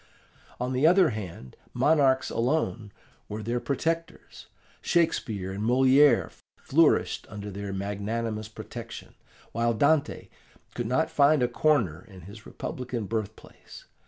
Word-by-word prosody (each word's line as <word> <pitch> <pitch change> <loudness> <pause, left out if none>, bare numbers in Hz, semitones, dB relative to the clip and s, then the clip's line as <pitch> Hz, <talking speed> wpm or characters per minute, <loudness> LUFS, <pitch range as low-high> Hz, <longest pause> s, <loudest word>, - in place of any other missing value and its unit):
On 125 +1 -2
the 130 +5 +3
other 180 -3 +5
hand, 90 - -8 0.2
monarchs 140 -4 +3
alone 120 -4 -1 0.4
were 105 +1 -5
their 120 +3 -1
protectors. 165 +7 -4 0.3
Shakespeare 110 - 0
and 100 +2 -4
Moliere 130 +2 +4 0.3
flourished - - +2
under 105 0 -7
their 100 0 -6
magnanimous 105 +3 -3
protection, 110 - -9 0.4
while 115 0 0
Dante 145 +4 +1 0.4
could 120 -2 -3
not 130 +7 0
find 145 -1 +4
a - - +3
corner 120 - +1
in 95 -5 -14
his 100 +6 -12
republican 125 -3 -5
birthplace. 110 -1 -7
115 Hz, 120 wpm, -27 LUFS, 105-140 Hz, 0.4 s, other